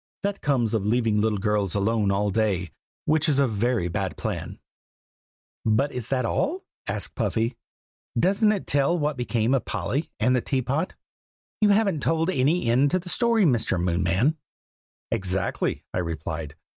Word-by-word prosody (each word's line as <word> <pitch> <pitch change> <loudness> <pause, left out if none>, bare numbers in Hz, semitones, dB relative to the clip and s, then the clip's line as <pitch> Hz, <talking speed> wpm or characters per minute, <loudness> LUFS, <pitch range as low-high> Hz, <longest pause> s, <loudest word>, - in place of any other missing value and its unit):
that 200 0 -2
comes 125 -6 +1
of 110 -3 +1
leaving 110 -1 +2
little 110 -1 +1
girls 105 -2 0
alone 105 0 +1
all 100 +1 +1
day, 95 -5 0 0.3
which 155 +1 +3
is 140 - +3
a 140 - +4
very 115 -3 0
bad 85 - -3
plan." - - -4 1.1
"But 115 +7 +2
is 125 -4 -4
that 130 -2 0
all?" 340 - -1 0.2
asked - - -3
Puffy. 115 +2 -1 0.6
"Doesn't 200 - +3
it 205 -3 -2
tell 145 +5 +2
what 150 -2 0
became 120 -1 0
of 130 -4 +2
Polly, 115 - -2
and 125 +3 +3
the 125 - +2
teapot? 135 +7 -1 0.6
You 210 - +4
haven't 200 -5 +3
told 165 +4 +1
any 145 +1 +2
end 125 +5 +3
to 185 - +2
the 180 0 -6
story, 230 0 +3
Mr. 115 - +1
Moonman." 90 - +1 0.7
"Exactly!" 95 0 -1
I - - 0
replied. 80 -2 -4
120 Hz, 155 wpm, -25 LUFS, 105-155 Hz, 1.1 s, a